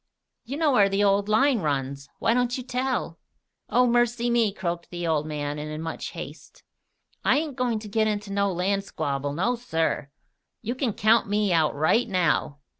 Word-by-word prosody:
You 270 +5 -5
know 315 -2 +3
where 205 -6 +5
the 195 +1 +1
old 200 +1 +2
line 250 +3 +4
runs. 140 -3 -2
Why 230 - +2
don't 245 0 +1
you 255 - -5
tell?" 250 -8 -2 0.5
"Oh, 250 - +4
mercy 240 0 +2
me!" 230 -3 +3
croaked 175 -3 -4
the 175 -1 -5
old 155 -2 0
man, 145 -1 -3
and 150 +1 -5
in 155 0 -5
much 165 0 -5
haste. - - -10 0.6
"I - - +4
ain't 300 -3 -2
goin' 250 -3 0
to 215 0 -7
git 215 +1 +1
into 205 -1 -2
no 200 0 +1
land 195 +3 0
squabble, 145 -6 -3
no, 195 +11 +1
sir! 165 - -1 0.5
You 230 +2 -2
kin 255 -4 -1
count 215 +1 +3
me 205 -2 +1
out 160 -3 +2
right 160 +11 +2
now!" 155 -5 0
200 Hz, 190 wpm, -25 LUFS, 160-240 Hz, 0.6 s, where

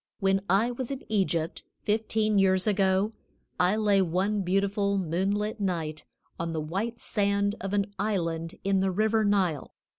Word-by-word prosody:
When 195 -1 +2
I 205 +6 +3
was 245 0 -4
in 275 -1 -5
Egypt, 175 -6 0 0.2
fifteen 215 -1 +1
years 190 -1 +3
ago, 195 0 +2 0.5
I 180 +3 +3
lay 205 -2 +3
one 190 +4 0
beautiful 200 +2 +1
moonlight 195 +5 -1
night 165 -6 -2 0.3
on 165 0 -2
the 160 - -1
white 195 +10 -3
sand 200 -1 0
of 195 +1 -3
an 200 0 -1
island 170 -5 -2
in 195 0 +2
the 190 0 +2
river 215 +3 +2
Nile. 190 -7 0
195 Hz, 150 wpm, -28 LUFS, 185-210 Hz, 0.5 s, I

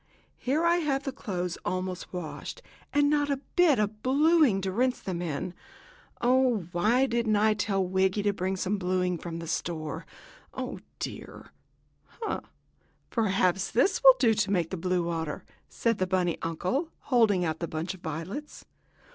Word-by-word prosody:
Here 290 +6 +1
I 340 +1 +4
have 280 -5 0
the 270 - -2
clothes 180 -9 -4
almost 185 -1 -3
washed, 180 - -6 0.3
and 290 0 +3
not 290 0 +2
a 280 - +1 0.2
bit 350 -7 +5
of 210 0 -1
bluing 285 - +4
to 190 0 -2
rinse 250 +5 +1
them 180 -3 -4
in. 175 +2 -3 0.7
Oh, 250 -5 +3
why 215 +9 +3
didn't 235 -3 +1
I 215 +1 +4
tell 195 -2 0
Wiggy 190 +2 +1
to 205 0 +2
bring 190 0 -1
me - - -3
some 195 +2 -1
blueing 180 -1 0
from 165 0 -6
the 170 - -6
store? 160 -1 -3 0.5
Oh, - - -4 0.2
dear!" - - -7 0.7
"Ha! - - -2 0.7
Perhaps 190 -4 +1
these 370 - +2
will 265 -1 +10
do 240 -3 +4
to 210 -2 0
make 175 -5 0
blue 180 -1 0
water," 165 -3 -3 0.3
said 230 -2 0
the 185 - +1
bunny 180 -2 0
uncle, 185 - -1 0.2
holding 205 -7 +4
out 160 -1 -2
the 170 - -2
bunch 160 +4 -3
of 185 - -13
violets. 180 - -6
195 Hz, 165 wpm, -28 LUFS, 180-255 Hz, 0.7 s, will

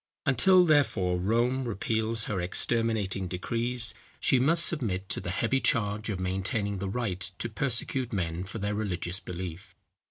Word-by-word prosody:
Until, 180 +7 +5
therefore, 115 - +2
Rome 120 +7 +1
repeals 110 0 -1
her 95 -4 -2
exterminating 100 0 0
decrees, 115 +6 0 0.3
she 130 - +3
must 165 +6 +5
submit 100 - -1
to - - -2
the - - -5
heavy 115 +9 +1
charge 105 -3 0
of 100 -3 -2
maintaining 95 +2 -1
the 95 0 -3
right 100 -4 -2 0.2
to - - -2
persecute 125 +1 -1
men 90 -4 -2
for 105 +4 -7
their 100 0 -2
religious 95 -3 -2
belief. 90 0 -7
110 Hz, 150 wpm, -28 LUFS, 95-120 Hz, 0.3 s, Until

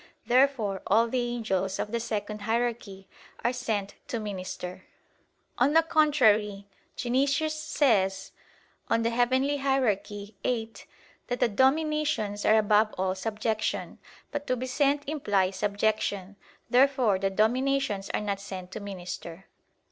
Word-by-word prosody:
Therefore 245 -6 +2
all 225 +4 +4
the 250 +2 0
angels 195 -5 -1
of 210 - -3
the 235 - 0
second 210 -2 -4
hierarchy 225 -3 -2 0.4
are 240 - +1
sent 215 -5 -2
to 235 - -3
minister. 185 -3 -6 0.7
On 265 +4 +4
the 325 +1 +6
contrary, 220 -11 +3 0.3
Dionysius 280 +5 +1
says 200 -11 +1 0.6
(Coel. 230 - +2
Hier. 235 +1 +2
viii) 245 -5 -1 0.5
that 245 -1 -2
the - - +4
"Dominations 265 -4 +1
are 220 - +5
above 215 0 +3
all 185 0 0
subjection." 215 +2 -2 0.3
But 290 0 -4
to 255 - +1
be 250 +1 -4
sent 280 +2 +1
implies 200 -11 0
subjection. 205 -1 -1 0.3
Therefore 250 -5 +3
the 195 0 +1
dominations 220 0 +1
are - - -1
not 200 -2 -2
sent 190 -2 -8
to 215 - -5
minister. 185 -3 -7
220 Hz, 125 wpm, -28 LUFS, 200-260 Hz, 0.7 s, the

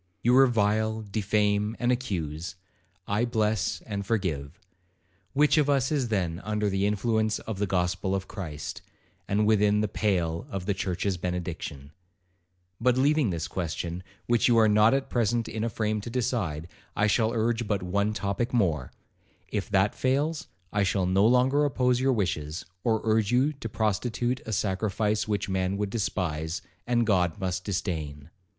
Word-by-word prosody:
You 120 +2 +4
revile, 110 -3 +3
defame, 105 +1 0
and 120 0 +1
accuse,—I 95 - -4
bless 110 -2 0
and 100 -2 -4
forgive; 90 -7 -2 0.7
which 150 +2 +4
of 145 -1 +2
us 135 -1 +2
is 140 -5 +1
then 90 -5 -1
under 105 -1 0
the 95 +1 +1
influence 110 +1 +1
of 110 -4 -6
the 105 - 0
gospel 90 +1 0
of 95 0 -3
Christ, 80 -8 -6 0.5
and 105 +2 +2
within 105 -1 +3
the 110 - +1
pale 90 -1 -1
of 95 -6 -4
the 100 - +1
church's 95 0 -2
benediction? 85 -5 -5 0.9
But 125 +1 +3
leaving 145 -2 +3
this 85 -3 -2
question, 85 0 -4 0.2
which 120 -1 +3
you 120 -2 +4
are 110 -1 +6
not 105 +3 +5
at 135 - -1
present 115 -1 0
in 110 0 -3
a 115 - 0
frame 110 -1 -1
to 120 - -6
decide, 115 - -2 0.3
I 105 - +2
shall 110 +1 +2
urge 115 0 0
but 100 -2 -1
one 100 +3 0
topic 110 +4 -1
more; 80 - +1 0.6
if 105 -3 -3
that 100 0 +3
fails, 145 +5 0 0.3
I 105 - +2
shall 95 -1 +1
no 95 +3 +4
longer 130 +4 +4
oppose 125 -3 +2
your 135 +1 +2
wishes, 80 -7 -2 0.2
or 110 -2 +1
urge 110 -2 +2
you 130 +5 +3
to 135 -5 -7
prostitute 115 +4 -1
a - - -3
sacrifice 105 +2 0
which 105 -1 -1
man 95 0 -1
would 100 -1 -2
despise, 85 -7 -2 0.2
and 120 -1 +2
God 90 -4 +1
must 90 -1 -2
disdain. 80 -6 -4
105 Hz, 160 wpm, -27 LUFS, 95-115 Hz, 0.9 s, are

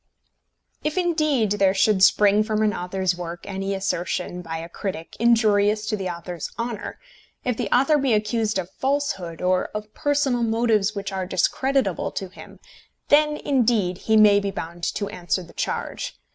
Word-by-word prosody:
If, 305 +3 -2
indeed, 305 - +1
there 195 -2 +2
should 195 0 +3
spring 205 +1 +5
from 215 0 0
an 210 -1 +2
author's 185 0 -1
work 175 -1 -6
any 195 0 -3
assertion 180 -1 -2
by 165 -2 -5
a 165 +1 -6
critic 170 -1 -6
injurious 215 -2 +3
to - - +1
the 190 -3 -3
author's 170 -1 -6
honour, 230 -2 -4 0.5
if 250 -2 0
the - - -3
author 275 +4 +4
be 270 -2 +1
accused 215 0 0
of 185 -1 -4
falsehood 265 - -2
or 185 0 +2
of 210 0 -6
personal 285 -5 +1
motives 225 -2 +1
which 200 0 -4
are 190 -1 -3
discreditable 265 - 0
to 190 - -4
him, - - -13 0.5
then, 300 +1 +4
indeed, 225 -11 +1
he 220 0 +2
may 210 -1 +7
be 200 0 -2
bound 170 -2 -7
to 200 - -2
answer 180 +1 -2
the 170 - -15
charge. - - -4
210 Hz, 165 wpm, -23 LUFS, 185-240 Hz, 0.5 s, may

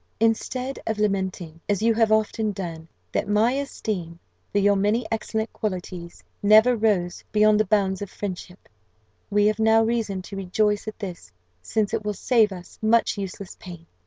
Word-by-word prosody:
"Instead 250 +4 0
of 220 - -1
lamenting, 190 -5 -2
as 205 0 +1
you 230 0 +4
have 225 -1 +2
often 220 0 +1
done, 165 -4 -6 0.2
that - - -1
my 215 +3 +3
esteem 215 -11 -3 0.3
for - - 0
your 205 0 +4
many 210 +4 +1
excellent 220 0 -2
qualities 180 -4 -5 0.2
never 220 +4 +6
rose 205 -6 0
beyond 215 0 +4
the 215 - +3
bounds 195 -2 +1
of 200 - -5
friendship, 185 -2 -7 0.6
we 205 0 +3
have 215 +1 +2
now 220 0 +5
reason 220 -5 -1
to 195 - -9
rejoice 205 +3 0
at 215 - -5
this, 180 - -7 0.3
since 210 - -1
it - - -1
will 210 0 -2
save 220 0 +3
us 180 -2 -10
much 225 +1 +3
useless 195 -2 -6
pain. 175 -2 -10
210 Hz, 165 wpm, -24 LUFS, 190-220 Hz, 0.6 s, never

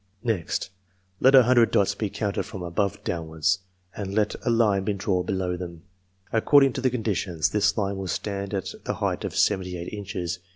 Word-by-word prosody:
Next, 100 -5 -1 0.5
let 135 +1 +6
a 130 - +9
hundred 120 -1 +5
dots 100 0 +2
be 105 +1 -3
counted 100 0 -2
from 95 - -7
above 100 +4 -1
downwards, 85 +1 0 0.4
and 100 -1 -4
let 105 -1 +2
a - - 0
line 110 -4 +3
be 105 - 0
drawn 95 -2 -1
below 95 -2 -1
them. 85 -2 -8 0.5
According 135 +4 +5
to 135 - -3
the 130 - +3
con 125 -2 -3
ditions, 90 -7 0
this 105 +2 +2
line 100 -2 -1
will 95 -1 -4
stand 100 +2 -3
at 95 - -3
the - - -2
height - - -2
of - - -4
seventy 90 -3 +1
eight 85 +4 -7
inches. 90 -4 -4
100 Hz, 195 wpm, -25 LUFS, 90-110 Hz, 0.5 s, a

